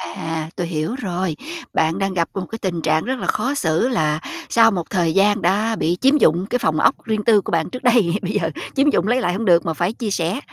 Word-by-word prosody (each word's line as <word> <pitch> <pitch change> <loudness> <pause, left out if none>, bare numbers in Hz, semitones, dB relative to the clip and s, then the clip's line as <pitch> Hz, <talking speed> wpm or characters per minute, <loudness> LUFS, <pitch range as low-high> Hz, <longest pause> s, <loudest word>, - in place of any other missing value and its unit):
À, 160 -1 -4
tôi 175 -2 -3
hiểu 160 +6 -2
rồi. 185 - -3 0.4
Bạn 160 +2 +1
đang 195 -1 -1
gặp 170 -2 0
một 190 -2 -4
cái 225 - -5
tình 175 -3 -2
trạng 155 0 +1
rất 260 0 -2
là - - -4
khó 270 - 0
xử 170 - +1
là 155 -11 0 0.3
sau 225 -1 +5
một 175 -5 -4
thời 170 -4 0
gian 205 +2 +3
đã 210 +6 +1
bị 175 -3 0
chiếm 270 +3 +4
dụng 175 - +3
cái 250 - 0
phòng 155 -8 0
ốc - - +4
riêng 215 -2 -1
tư 215 -2 +4
của - - -6
bạn 165 -1 0
trước 255 - -8
đây, 230 -8 +3
bây 190 0 -3
giờ 195 -6 -1 0.3
chiếm 275 +2 +3
dụng 185 -8 +1
lấy 245 +3 +2
lại 180 -6 0
hông 215 +5 -3
được 170 -3 +4
mà 165 - -1
phải 175 +6 -1
chia 230 -2 -4
sẻ, 180 +5 -1
190 Hz, 255 wpm, -20 LUFS, 165-225 Hz, 0.4 s, sau